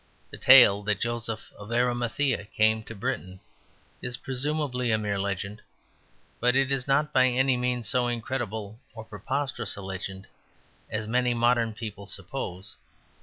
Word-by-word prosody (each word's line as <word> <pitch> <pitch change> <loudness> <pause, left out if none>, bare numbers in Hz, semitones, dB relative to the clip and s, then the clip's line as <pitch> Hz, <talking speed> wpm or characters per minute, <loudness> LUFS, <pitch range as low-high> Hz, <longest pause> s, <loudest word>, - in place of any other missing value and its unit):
The - - -8
tale 120 -6 +8
that 105 -2 +1
Joseph 115 -1 -3
of 105 +2 -9
Arimathea 120 0 0
came 110 +1 +4
to 115 - -8
Britain 100 -5 -4 0.6
is 125 -1 -4
presumably 135 -2 -2
a 110 - +3
mere 105 -2 -2
legend. 100 +2 -3 0.8
But 125 +2 +3
it 135 0 +2
is 135 -2 0
not 145 +2 +2
by 130 -1 +5
any 130 +1 +2
means 125 -2 -1
so 125 +2 +1
incredible 110 -3 -4 0.2
or 110 -1 -8
preposterous 135 +8 0
a 100 - -8
legend 95 0 -6 0.6
as 110 0 -3
many 125 +2 +1
modern 120 -1 +2
people 105 -3 -7
suppose. 95 -1 -6
120 Hz, 145 wpm, -27 LUFS, 105-125 Hz, 0.8 s, tale